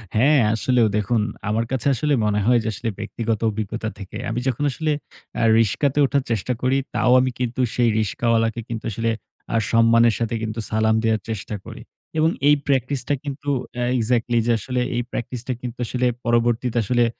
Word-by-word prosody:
হ্যাঁ, 140 +5 +5
আসলেও 120 0 +2
দেখুন 105 +2 +1 0.3
আমার 115 +2 0
কাছে 130 +1 -1
আসলে 145 +4 0
মনে 105 0 +1
হয় 120 0 +4
যে, - - -4
আসলে 115 +4 -3
ব্যক্তিগত 110 0 -2
অভিজ্ঞতা 110 +1 -3
থেকে। 100 +2 -8
আমি 115 +2 -1
যখন 130 +2 -1
আসলে 155 +3 -1 0.5
আ - - +2 0.2
রিকশাতে 130 +6 +1
ওঠার 140 0 +1
চেষ্টা 115 +3 0
করি, 130 +2 +2 0.2
তাও 125 - +3
আমি 130 0 +1
কিন্তু 125 +1 -1
সেই 120 -1 +3
রিকশাওয়ালা 115 +1 +1
কে 120 - -5
কিন্তু 115 -2 -5
আসলে 115 +2 -1 0.4
আ - - +1 0.2
সম্মানের 115 0 +5
সাথে 115 -1 -1 0.4
সালাম 110 0 +2
দেওয়ার 110 -2 +1
চেষ্টা 105 -1 -4
করি - - -9 0.4
এবং 160 +1 +4 0.2
এই 150 - +7
প্র্যাকটিস 135 -1 0
টা 145 - +2
কিন্তু 145 0 -5 0.3
এ্যা 120 0 -1
এক্সাক্টলি 120 0 +1
যে, 120 - +4
আসলে 125 +4 -2
এই 120 - +1
প্র্যাকটিস 120 0 -4
টা 130 - 0
কিন্তু 125 -1 -6
আসলে 125 +2 -1 0.2
পরবর্তীতে 120 +1 +1
আসলে 120 +3 +3
120 Hz, 180 wpm, -22 LUFS, 110-125 Hz, 0.5 s, এই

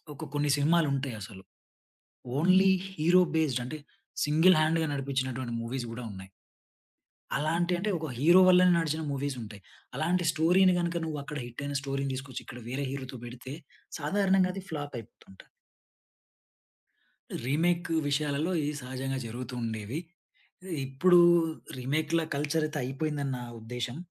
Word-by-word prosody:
ఒక 150 - -8
కొన్ని 145 0 +1
సినిమాలు 160 +3 +3
ఉంటాయసలు 110 -7 -6 1.0
ఓన్లీ 185 +4 +5 0.2
హీరో 180 0 +4
బేస్డ్ 140 -6 +1
అంటే 155 +5 -6 0.5
సింగిల్ 160 +5 +5
హ్యాండ్‌గా 160 +1 +2
నడిపించినటువంటి 130 -3 -2
మూవీస్ 120 +1 -4
కూడా 120 +2 -6
ఉన్నాయి. 95 -1 -9 1.1
అలాంటి 165 +5 0
అంటే 210 +4 -1
ఒక 160 -1 -5
హీరో 170 +7 +6
వల్లనే 180 0 +6
నడిచిన 160 -1 -1
మూవీస్ 140 0 -2
ఉంటాయి. 105 -2 -10 0.3
అలాంటి 175 +1 0
స్టోరీని 180 +4 +4
గనుక 170 0 -1
నువ్వు 155 -2 -3
అక్కడ 150 +1 -6
హిట్ 120 +3 -8
అయిన 140 0 -2
స్టోరీని 135 0 -2
తీసుకొచ్చి 130 0 -6
ఇక్కడ 125 -1 -9
వేరే 135 +3 -2
హీరోతో 130 -2 -6
పెడితే 125 +3 -8 0.5
సాధారణంగా 190 +3 +2
అది 195 - -6
ఫ్లాప్ 145 -2 -5
అయిపోతుంటది. 100 -4 -14 2.0
రీమేక్ 170 +6 +1 0.2
విషయాలలో 145 +3 0
ఇది 145 +1 -1
సహజంగా 130 +1 -3
జరుగుతూ 125 +2 -6
ఉండేవి. 110 +3 -3 0.9
ఇప్పుడు 175 +7 +5 0.6
రీమేక్‌ల 155 +6 0
కల్చర్ 150 +2 0
అయితే 155 - -4
అయిపోయిందని 140 +1 -2
నా - - -7 0.2
ఉద్దేశ్యం. 120 +2 -5
145 Hz, 130 wpm, -29 LUFS, 130-165 Hz, 2.0 s, హీరో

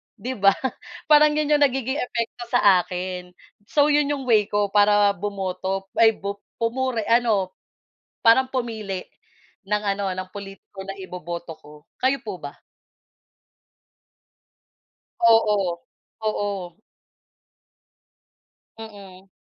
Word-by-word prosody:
'di 240 +3 -5
ba 195 0 +5 0.6
parang 300 0 +7
'yon 305 -1 0
'yong - - +2
nagiging 265 0 0
epekto 240 -1 -3
sa 205 -6 +5
akin. 180 0 -6 0.3
So 290 +3 +3
'yon 295 0 +3
'yong 280 -2 -2
way 215 -4 +4
ko 205 -2 0
para 205 0 +5
bumoto 195 0 -4
ay 225 -1 +6
bup 200 0 -5 0.2
pumuri 235 0 -1
ano. 225 -5 +2 0.7
Parang 245 +3 +5
pumili, 220 -7 -4 0.6
ng 210 0 0
ano, 195 -1 -2
ng 185 0 -5
pulitiko 195 0 -10
na 195 0 -7
iboboto 175 -2 -7
ko. 150 -1 -17
Kayo 265 +2 +2
po - - -5
ba? - - -7 2.7
Oo, 210 -6 +3 0.5
oo. 195 -4 -4 2.0
Mm. 195 -4 -12
205 Hz, 110 wpm, -23 LUFS, 190-235 Hz, 2.7 s, parang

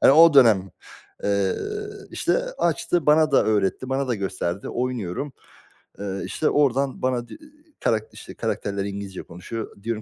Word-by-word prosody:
Hani, - - +8
o 165 +1 +8
dönem. 110 -8 +6 0.5
Eee, 100 -1 +2 0.6
işte, - - +1 0.2
açtı, 175 -5 +1
bana 155 +1 +5
da - - +5
öğretti, 110 +3 0
bana 135 0 -1
da 120 - +1
gösterdi. 95 -2 -3
Oynuyorum. 125 +1 -3 0.7
Eee, 100 -1 -4
işte 155 - 0
oradan 140 -1 +1
bana 125 -2 0
di - - -11
iii, 305 0 -21
karak 110 -1 +2
işte, - - -10
karakterler 100 -1 -2
İngilizce 100 -1 -6
konuşuyor. 100 +4 -8
Diyorum 115 -1 -2
115 Hz, 150 wpm, -24 LUFS, 100-140 Hz, 0.7 s, Hani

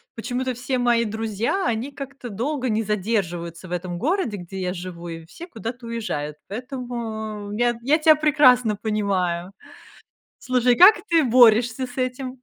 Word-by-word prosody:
почему-то 250 +2 -3
все 250 +1 -2
мои 240 -1 +2
друзья, 220 - -2
они 240 +4 -2
как-то 275 -2 -8
долго 260 +5 -2
не 220 0 0
задерживаются 185 -5 -2
в - - -12
этом 175 0 -3
городе, 290 - -1
где 185 +2 -8
я 180 0 -2
живу, 175 -1 -8
и 165 -1 -7
все 340 - -10
куда-то 235 - -7
уезжают, 180 -11 -4
поэтому 220 -4 -5
я 240 +2 +1
я 285 +5 +3
тя 310 -1 +6
прекрасно 255 -7 +4
понимаю. 195 -4 -1 0.9
Слушай, 250 -1 +2
как 390 +5 +8
ты 330 -2 +4
борешься 240 0 +4
с 245 0 -13
этим? 255 0 -3
230 Hz, 150 wpm, -23 LUFS, 200-255 Hz, 0.9 s, как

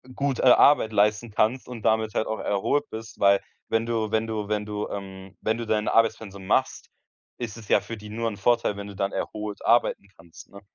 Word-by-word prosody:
gut, 140 -2 -1
äh, - - -1
Arbeit 130 -2 +6
leisten 105 +2 +2
kannst 115 +4 0
und 120 -3 -8
damit 110 -1 +1
halt 110 - -1
auch 110 - -3
erholt 140 +9 0
bist, 110 0 -9
weil 100 0 +4 0.3
wenn 115 0 +1
du 110 -2 -1
wenn 110 0 0
du 110 -2 -3
wenn 105 0 -1
du 105 0 -4
ähm, 95 -1 -8
wenn 110 +1 0
du 115 - -4
dein 110 -1 0
Arbeitspensum 110 -4 0
machst, - - 0 0.5
ist 115 -3 -6
es 110 -3 -12
ja 100 - +4
für 110 +3 -7
die 105 0 -11
nur 115 +2 -2
'n 105 - -8
Vorteil, 115 0 +1
wenn 100 0 -6
du 100 - -10
dann 100 0 -1
erholt 105 -1 -5
arbeiten 115 -3 +2
kannst, 85 0 -15
ne? 100 - -13
110 Hz, 220 wpm, -25 LUFS, 100-115 Hz, 0.5 s, Arbeit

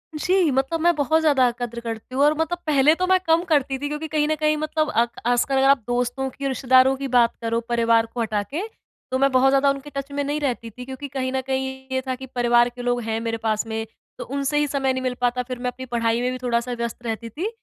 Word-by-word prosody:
जी, 360 +2 +2
मतलब 270 +5 0
मैं 345 +1 +4
बहुत 310 +2 +2
ज़्यादा 275 -5 +4
कद्र 235 -1 -4
करती 230 +2 -6
हूँ 275 - +3
और 295 +1 +5
मतलब 320 +2 0
पहले 295 0 +5
तो 365 +2 -1
मैं 375 0 +4
कम 330 +1 +3
करती 280 -5 +1
थी 290 - -3
क्योंकि 300 +1 -4
कहीं 300 -1 0
न 310 - +1
कहीं 305 0 +1
मतलब 310 0 -1
आक 235 -4 +1 0.2
आजकल 245 +3 +2
अगर 265 0 +4
आप 280 - +6
दोस्तों 245 +2 -1
की 275 +2 -5
रिश्तेदारों 260 0 +4
की 275 0 -4
बात 235 -1 +4
करो 230 0 0
परिवार 230 -1 +3
को 245 - -2
हटा 215 -2 -1
के, 295 - -5 0.5
तो 260 - +1
मैं 275 0 +3
बहुत 260 +1 +4
ज़्यादा 275 +1 +4
उनके 275 +1 -3
टच 275 0 -4
में 285 0 -2
नहीं 290 +2 -2
रहती 245 -5 -2
थी 250 +3 -10
क्योंकि 265 +2 -7
कहीं 260 -1 -3
न 265 - -1
कहीं 265 0 -3
ये 260 0 0
था 260 - -1
कि 265 +1 -9
परिवार 240 0 +4
के 245 0 -10
लोग 245 0 0
हैं 225 0 -2
मेरे 230 0 -2
पास 220 -1 -1
में, 220 0 -3 0.3
तो - - -5
उनसे 280 +2 -2
ही 295 0 +2
समय 270 -2 0
नहीं 260 - -3
मिल 255 -1 0
पाता 245 0 +1
फिर 255 -1 -5
मैं 250 0 -1
अपनी 260 +1 -9
पढ़ाई 235 -1 0
में 250 +1 0
भी 255 - -4
थोड़ा-सा 235 0 0
व्यस्त 235 0 -5
रहती 230 0 -4
थी, 340 - -3
260 Hz, 260 wpm, -23 LUFS, 240-285 Hz, 0.5 s, आप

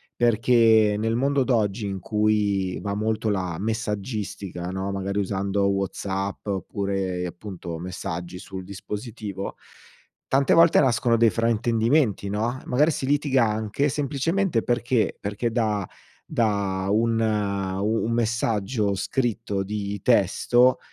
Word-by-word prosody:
perché, 115 -2 +4
nel 115 +1 0
mondo 135 +2 +1
d'oggi 110 -4 0
in 95 -1 -4
cui 105 -3 +1
va 100 -1 -3
molto 110 +1 -1
la 90 -4 -1
messaggistica, 105 -4 -3
no, 95 +1 -3
magari 100 0 -3
usando 100 0 0
WhatsApp 95 0 -3
oppure 95 -2 -2
appunto, 90 -2 -7
messaggi 90 0 -5
sul 95 0 -8
dispositivo, 100 +1 -6 0.7
tante 135 0 +3
volte 165 0 +6
nascono 120 -3 +2
dei 115 0 +5
fraintendimenti, 115 +1 +1
no, 115 +5 -1
e - - -18
magari 150 +6 +3
si 135 - -3
litiga 140 -3 +2
anche 110 +6 0
semplicemente 150 +2 0
perché? 120 -1 +1
Perché 105 +3 -2
da 105 -5 0 0.4
da 100 -7 0
un 115 +2 +2
u 100 -1 0
un 115 - -1
messaggio 110 -2 0
scritto 110 -1 -1
di 100 0 -4
testo 120 +3 +3
105 Hz, 120 wpm, -24 LUFS, 100-115 Hz, 0.7 s, volte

